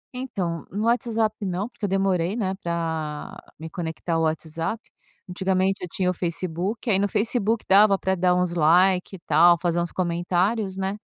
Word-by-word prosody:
Então, 190 -10 -4
no 205 +3 -3
WhatsApp 230 -2 +1
não, 190 +2 -2
porque 240 -3 -6
eu - - -2
demorei, 190 -1 +1
né, 195 -5 -1
pra 160 -3 -3 0.2
me 160 - -6
conectar 165 0 -4
ao 165 - +1
WhatsApp. 160 +5 -2 0.5
Antigamente 190 +1 0
eu - - -3
tinha 185 - -1
o - - -4
Facebook, 180 +6 -3
aí 195 -4 +3
no 200 - +2
Facebook 220 +2 0
dava 200 +1 +6
pra 190 0 0
dar 180 -1 +2
uns 180 -1 0
like 180 +4 +3
e - - -11
tal, 170 +3 +5
fazer 175 0 0
uns 170 - -3
comentários, 185 +3 0
né? 195 +1 -2
185 Hz, 175 wpm, -24 LUFS, 170-200 Hz, 0.5 s, dava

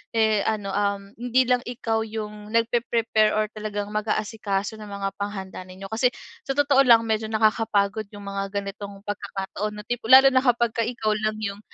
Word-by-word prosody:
eh, 220 -2 +3
ano, 205 -3 -1
um, 200 0 0 0.2
hindi 245 +1 +2
lang 250 0 +3
ikaw 225 -2 -1
yung 210 -1 -6
nagpepre-prepare 230 -2 +2
or 215 0 +2
talagang 210 -1 -4
mag-aasikaso 215 -1 -2
ng 210 -1 -9
mga 200 -1 -3
panghanda 195 -2 -5
ninyo. 190 +1 -9
Kasi 230 +3 +3 0.4
sa 270 - -1
totoo 285 -1 +4
lang 230 -3 +6
medyo 220 0 0
nakakapagod 215 -1 +1
yung 205 - -9
mga 195 0 -3
ganitong 200 0 -8
pagkakataon 205 0 -4
na 210 - -8
tipo 240 -2 -4
lalo 265 +1 +9
na 260 - +5
kapagka 235 -2 +2
ikaw 235 -3 -1
lang 215 0 -1
yung, 200 -1 -3
215 Hz, 170 wpm, -24 LUFS, 200-230 Hz, 0.4 s, lalo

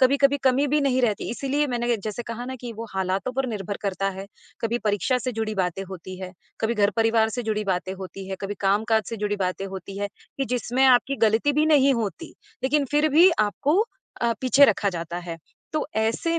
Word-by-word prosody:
कभी-कभी 275 +2 +4
कमी 265 +2 +3
भी 295 +2 +2
नहीं 260 -2 +2
रहती, 215 -4 0
इसीलिए 280 +4 0
मैंने 240 -2 0
जैसे 215 +3 -5
कहा 235 +1 -6
ना 260 +1 -5
कि 240 -2 -6
वो 225 +1 -7
हालातों 190 +5 -1
पर 265 0 -1
निर्भर 205 -2 -4
करता 195 0 -1
है, 195 +1 -7 0.3
कभी 230 +1 0
परीक्षा 215 +3 +1
से 255 +1 -3
जुड़ी 220 -1 -2
बातें 185 0 -1
होती 185 0 -8
हैं, 185 -1 -6 0.3
कभी 225 +1 +1
घर-परिवार 220 +2 +3
से 245 +2 -3
जुड़ी 215 -1 -1
बातें 190 -1 -1
होती 190 0 -8
हैं, 190 - -4
कभी 200 +1 -3
कामकाज 215 +3 +2
से 230 - -4
जुड़ी 205 -1 -1
बातें 185 0 -2
होती 195 0 -7
हैं, 205 0 -2 0.3
कि 270 - +1
जिसमें 250 +1 0
आपकी 260 +2 +4
ग़लती 225 +6 +3
भी 300 +2 +3
नहीं 280 -3 +5
होती 230 - -3 0.4
लेकिन 280 +2 +2
फिर 295 +1 +3
भी 330 +6 +7
आपको 275 - +1 0.4
अ, 235 -1 +2
पीछे 265 +2 +6
रखा 210 -6 +2
जाता 170 -1 -4
है। 165 -1 -5 0.4
तो 310 - -1
ऐसे 230 +10 +1
225 Hz, 205 wpm, -24 LUFS, 195-260 Hz, 0.4 s, भी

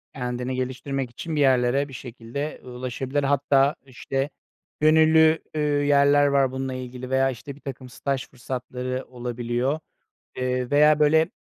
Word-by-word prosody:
Kendini 125 -1 -3
geliştirmek 130 +1 -3
için 155 +7 -6
bir 150 - +1
yerlere 130 +1 +3
bir 135 - -13
şekilde 125 +4 -6
ulaşabilir. 130 +3 -3
Hatta, 140 0 +3
işte, 135 +2 -3 0.5
gönüllü, 160 +1 +5
üüü, 150 -2 +1
yerler 145 0 +5
var 140 -2 +2
bununla 130 0 -3
ilgili 125 0 -7
veya, 135 0 +3
işte, 135 +2 -7
birtakım 135 -3 -8
staj 135 +2 -3
fırsatları 130 0 -5
olabiliyor, 120 +3 -2 0.6
eee, 125 0 -1
veya, 150 +1 +5
böyle, 160 +2 +4
135 Hz, 130 wpm, -24 LUFS, 125-145 Hz, 0.6 s, gönüllü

